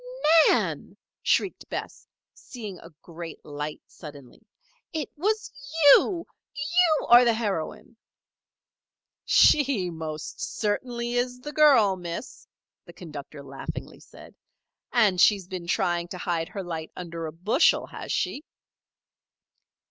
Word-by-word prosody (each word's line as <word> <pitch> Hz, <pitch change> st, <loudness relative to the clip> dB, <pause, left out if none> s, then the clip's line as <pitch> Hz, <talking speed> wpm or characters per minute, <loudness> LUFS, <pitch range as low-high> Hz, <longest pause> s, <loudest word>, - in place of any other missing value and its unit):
"Nan!" -, -, -1 dB, 0.2 s
shrieked 385 Hz, -, 0 dB
Bess, -, -, -6 dB, 0.3 s
seeing 215 Hz, -8 st, -9 dB
a 165 Hz, -, -13 dB
great 170 Hz, -1 st, -9 dB
light 150 Hz, 0 st, -6 dB
suddenly. 145 Hz, -6 st, -13 dB, 0.5 s
"It 315 Hz, -3 st, -4 dB
was 425 Hz, +7 st, -1 dB, 0.4 s
you! 345 Hz, -4 st, +3 dB, 0.3 s
You 320 Hz, +2 st, +2 dB
are 240 Hz, +1 st, +8 dB
the 235 Hz, -2 st, +3 dB
heroine!" 210 Hz, +1 st, -4 dB, 1.3 s
"She 260 Hz, -12 st, +4 dB
most 155 Hz, -2 st, -7 dB
certainly 235 Hz, +3 st, -2 dB
is 245 Hz, +1 st, -1 dB
the 295 Hz, +3 st, -7 dB
girl, 255 Hz, -11 st, +5 dB
Miss," 175 Hz, +6 st, -7 dB, 0.4 s
the -, -, -13 dB
conductor 150 Hz, -4 st, -10 dB
laughingly 135 Hz, 0 st, -8 dB
said. -, -, -15 dB, 0.6 s
"And 205 Hz, -7 st, +3 dB
she 210 Hz, -, +7 dB
has 190 Hz, -3 st, -10 dB
been 180 Hz, -2 st, -7 dB
trying 175 Hz, -2 st, 0 dB
to 180 Hz, -, -7 dB
hide 170 Hz, -1 st, -2 dB
her 195 Hz, -, -6 dB
light 165 Hz, -3 st, -6 dB
under 170 Hz, -2 st, -6 dB
a -, -, -6 dB
bushel, 180 Hz, +8 st, +2 dB
has -, -, -8 dB
she?" 290 Hz, -, -2 dB
190 Hz, 120 wpm, -26 LUFS, 165-250 Hz, 1.3 s, are